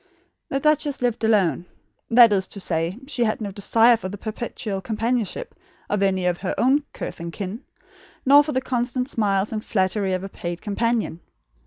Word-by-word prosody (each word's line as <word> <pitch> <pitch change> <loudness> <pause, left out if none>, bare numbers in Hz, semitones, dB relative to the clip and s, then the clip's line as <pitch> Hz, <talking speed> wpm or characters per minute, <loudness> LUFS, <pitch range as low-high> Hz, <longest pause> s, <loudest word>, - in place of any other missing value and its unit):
The 275 - 0
duchess 295 -2 +1
lived 240 -2 0
alone; 195 -5 +2 0.4
that 230 -2 +7
is 190 -2 0
to 200 - -8
say, 170 +1 -1
she 270 -4 -1
had 215 -2 0
no 205 -3 -4
desire 225 +4 +4
for 200 -5 -6
the 205 - -7
perpetual 215 -2 -4
companionship 230 - -2 0.4
of 205 -1 +1
any 190 -2 +1
of 175 -1 0
her 185 - -3
own 275 +4 +3
kith - - -7
and 170 0 -5
kin, 200 +6 -5 0.6
nor 285 +2 +8
for 300 - -3
the 260 - 0
constant 250 0 -1
smiles 205 -5 0
and 215 -1 -3
flattery 190 -1 0
of 185 0 -2
a - - -4
paid 175 -2 -5
companion. 220 -4 -1
215 Hz, 180 wpm, -23 LUFS, 190-240 Hz, 0.6 s, nor